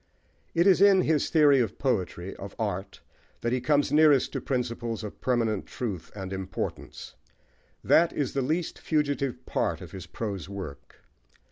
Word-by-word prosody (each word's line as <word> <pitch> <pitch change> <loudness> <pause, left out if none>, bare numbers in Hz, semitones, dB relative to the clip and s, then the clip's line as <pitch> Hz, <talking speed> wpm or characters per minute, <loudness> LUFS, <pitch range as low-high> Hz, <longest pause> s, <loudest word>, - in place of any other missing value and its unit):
It 170 +1 +4
is 190 -2 +5
in 200 -2 +7
his 155 -4 +1
theory 145 -4 +5
of 115 -7 -1
poetry, 95 -7 -2
of 100 0 -8
art, 100 -3 -4 0.4
that 120 +1 0
he 130 - 0
comes 145 +1 +2
nearest 150 -3 +5
to - - -2
principles 120 -3 -2
of 105 - -8
permanent 115 -5 0
truth 100 -9 -5
and 95 -1 -5
importance: 95 -2 -5 0.7
that 170 +1 +4
is 140 -4 -2
the 140 - 0
least 160 +6 -2
fugitive 145 -4 -1
part - - -1
of - - -10
his 95 -3 -8
prose 100 -6 -5
work. 95 -8 -9
125 Hz, 155 wpm, -27 LUFS, 100-150 Hz, 0.7 s, in